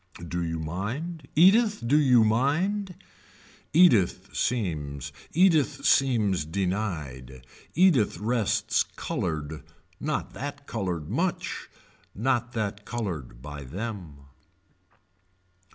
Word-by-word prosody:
Do 85 +1 -2
you 80 -1 -2
mind. 125 - -4
Edith 210 - +5
do 130 +5 +3
you 130 -6 +5
mind. 170 - +1 0.8
Edith 145 - +4
seems, 75 - -2 0.2
Edith 155 -5 +3
seems 110 - +3
denied. 80 - -3 0.3
Edith 155 - +4
rests 110 +2 +1
colored, 80 -2 -3 0.4
not 150 0 -3
that 145 +1 -6
colored 90 - -3
much, 170 - -2 0.5
not 120 +2 0
that 105 -3 -3
colored 85 - -5
by 75 -1 -7
them. 85 - -7
110 Hz, 90 wpm, -27 LUFS, -, 0.8 s, Edith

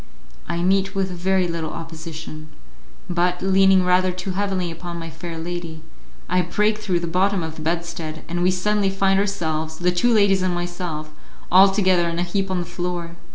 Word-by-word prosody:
I 170 0 -1
meet 195 +1 +2
with 190 -1 0
very 185 +1 +1
little 165 -2 -3
opposition, 160 -1 -8 0.6
but, 180 0 0
leaning 190 -1 +5
rather 180 0 +3
too 185 +1 -4
heavily 190 -2 -1
upon 170 +1 -6
my 165 -1 -6
fair 165 +1 -7
lady, 165 -1 -5 0.4
I 180 0 +2
break 210 +3 +1
through 185 -5 0
the - - -2
bottom 185 +2 +1
of 160 0 -5
the 155 - -8
bedstead, 165 -1 -3
and 175 +1 -2
we 180 - +4
suddenly 200 +2 +1
find 195 0 +2
ourselves, 160 -6 -2
the 180 +1 +2
two 210 +8 +2
ladies 200 -4 +4
and 185 -1 0
myself, 175 -3 -4 0.4
all 190 +2 +8
together 185 -3 +2
in 170 - -3
a 175 - +1
heap 195 +2 -1
on 185 - 0
the 175 - -3
floor. 175 -1 -4
180 Hz, 185 wpm, -22 LUFS, 170-190 Hz, 0.6 s, all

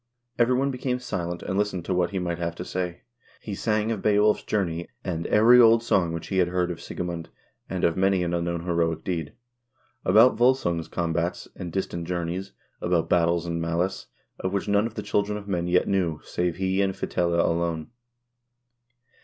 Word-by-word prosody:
Every 120 +2 +4
one 135 +2 +1
became 125 0 -2
silent, 90 -8 -4
and 95 - -1
listened 100 -5 -1
to - - -1
what 90 -1 +1
he 100 - -4
might 85 -2 -2
have 85 0 -2
to 90 - -6
say. 90 -1 -3 0.4
He 105 - -6
sang 110 +2 0
of 110 -4 -2
Beowulf's 105 0 +3
journey, 85 -5 -2 0.2
and 85 -3 -3
"Every 115 +4 +6
old 115 0 +6
song 90 -7 +2
which 85 -1 -5
he 95 - +1
had 90 - +4
heard 90 0 0
of 85 - -7
Sigemund, 85 -2 -5 0.4
and - - -3
of 85 - +3
many 95 -1 +2
an 85 0 -2
unknown 85 0 -1
heroic 85 -2 0
deed; 85 -5 -3 0.7
about 115 +4 +6
W0lsung's 120 -10 +2
combats 85 0 -2
and 90 - -6
distant 85 -2 -3
journeys, 90 +2 -3 0.3
about 85 -2 +1
battles 85 -1 +3
and 85 -1 -2
malice, 85 +3 -1 0.3
of 95 +1 -2
which 100 - -1
none 105 +2 +3
of 115 - -11
the 105 - -4
children 105 0 0
of 100 -1 -9
men 90 -3 -1
yet 90 +1 +2
knew, 85 -6 0
save 90 -1 -1
he 95 +1 0
and 95 -1 0
Fitela 85 -1 0
alone." 85 -1 -1
90 Hz, 185 wpm, -25 LUFS, 85-100 Hz, 0.7 s, Every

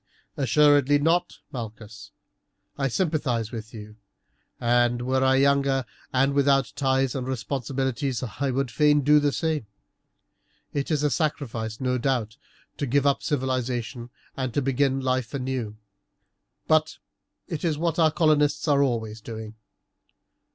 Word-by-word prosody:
"Assuredly 145 +2 +4
not, 165 +4 +1
Malchus; 110 -4 -8 0.7
I 135 -1 0
sympathize 130 - -1
with 110 -2 -7
you, 105 -1 -10 0.6
and 120 0 +2
were 130 +1 +1
I 130 0 +4
younger 140 -1 +2 0.3
and 135 +2 +2
without 135 -5 +2
ties 135 -2 +1
and 130 -2 -4
responsibilities 130 0 -2 0.2
would 135 -2 0
fain 150 -1 +4
do 150 +2 +5
the 145 -1 +1
same. 155 -6 -2 1.1
It 140 -1 -2
is 150 -2 0
a 150 - +2
sacrifice, 115 -7 -2
no 125 -1 0
doubt, 120 -4 -1 0.4
to 140 - -2
give 140 +3 +2
up 140 -1 +2
civilization 125 -3 -2 0.3
and 130 -2 -2
to 145 - +2
begin 135 0 +1
life 130 -2 -1
anew, 125 -5 -3 0.9
but 155 0 +2 0.5
it 160 -4 -5
is 160 -4 0
what 165 +1 -1
our 160 -1 +5
colonists 150 -2 +2
are 140 -2 +4
always 115 -5 -1
doing. 110 -1 -7
135 Hz, 130 wpm, -25 LUFS, 120-145 Hz, 1.1 s, do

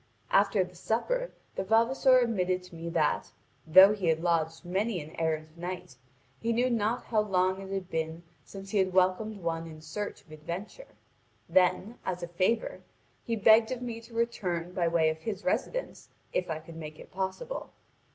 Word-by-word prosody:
After 200 -1 +4
the 180 0 -11
supper - - -1 0.2
the - - -2
vavasor 235 +5 +4
admitted 185 -7 +1
to 180 -2 -13
me 165 +1 -5
that, 160 -3 0 0.4
though 190 +5 +9
he 195 -4 -2
had 160 0 +2
lodged 165 -1 0
many 195 +3 0
an 155 0 -9
errant 155 -1 -1
knight, 180 -3 -6 0.4
he 230 - -1
knew 245 +2 +2
not 230 +1 0
how 220 -2 +1
long 190 -2 +1
it 195 0 -8
had 195 -2 -3
been 160 +1 -3 0.2
since 195 0 -10
he 210 - +2
had 185 -1 +1
welcomed 190 +2 +1
one 165 0 -2
in 155 -1 -10
search 160 +7 -5
of 155 - -21
adventure. 175 - -7 0.5
Then, 185 +5 +2
as 180 -1 -3
a - - -3
favour, 185 +7 0 0.4
he 230 - -1
begged 220 +1 +6
of 250 -1 -3
me 230 -2 -5
to 230 0 -14
return 180 -7 -1
by 175 -2 +1
way 165 -1 +3
of 160 - -7
his 205 +2 -5
residence, - - -2 0.2
if 180 - -1
I 160 - -1
could 160 +1 -11
make 155 -1 -8
it - - -13
possible. 195 - -4
185 Hz, 180 wpm, -29 LUFS, 170-220 Hz, 0.5 s, though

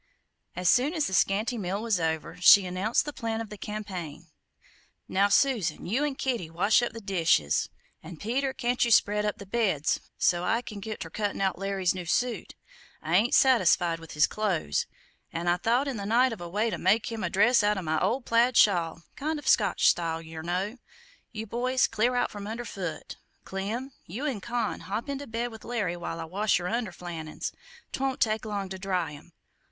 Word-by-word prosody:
As 180 0 -2
soon 265 - +4
as 310 - +1
the 190 - -3
scanty 210 +6 +1
meal 190 +1 -2
was 220 -4 0
over, 160 0 -2
she 185 +2 +8
announced 185 +8 0
the 295 - -5
plan 225 -4 -3
of 225 -2 -6
the - - -6
campaign: 185 -7 -6 0.8
"Now 200 +2 +2
Susan, 210 - +2
you 240 +10 0
an' 295 -2 -1
Kitty 240 -12 -2
wash 195 +8 +3
up 240 - -1
the 230 - -7
dishes; 165 - +1 0.3
an' 165 +1 -10
Peter, 260 - -1
can't 245 -1 0
you 240 - +1
spread 210 -1 +4
up 210 - -2
the 200 - -9
beds, 190 -8 +1 0.2
so't 175 0 +2
I 230 +7 +1
can 210 -3 -8
git 215 +2 -6
ter 165 - -6
cuttin' 205 +1 -2
out 190 -2 0
Larry's 195 -2 0
new 180 -2 -6
suit? 245 +7 -1 0.5
I 160 +2 0
ain't 220 +6 +4
satisfied 180 -9 +4
with 165 -1 -11
his 150 - +4
close, 185 - -1 0.4
an' 170 +1 -4
I 175 0 +3
thought 240 +8 +1
in 270 -4 -3
the 200 - -5
night 245 +3 +3
of 215 - -9
a 175 - -6
way 215 +5 0
to - - -3
make 210 +5 +2
him 225 -3 -4
a 175 - 0
dress 220 +7 +4
out 210 0 +2
of 190 - -3
my 155 0 +1
old 235 +7 0
plaid 235 +1 +3
shawl 170 -4 +3
kind 305 +2 -2
o' 295 - -8
Scotch 205 -7 +3
style, 165 -1 +2
yer 160 -1 -8
know. 185 +8 -2 0.5
You 220 -1 -5
other 220 - -13
boys 255 +2 +2
clear 240 +3 +1
out 245 - +1
from 205 -1 -7
under 230 +3 -5
foot! 180 -7 -6 0.3
Clem, 215 +8 -4 0.2
you 230 - -5
and 255 -9 -2
Con 235 -1 -2
hop 215 +8 -4
into 280 0 -4
bed 235 +1 -3
with 220 -1 -11
Larry 215 -7 -2
while 170 -1 -5
I 165 - -4
wash 200 +6 +1
yer 175 - -5
underflannins; 175 -7 -4 0.4
'twont 270 -1 -1
take 220 0 +1
long 205 -2 -3
to 190 0 -6
dry 185 -4 -1
'em. 155 +4 -14
205 Hz, 205 wpm, -28 LUFS, 175-235 Hz, 0.8 s, she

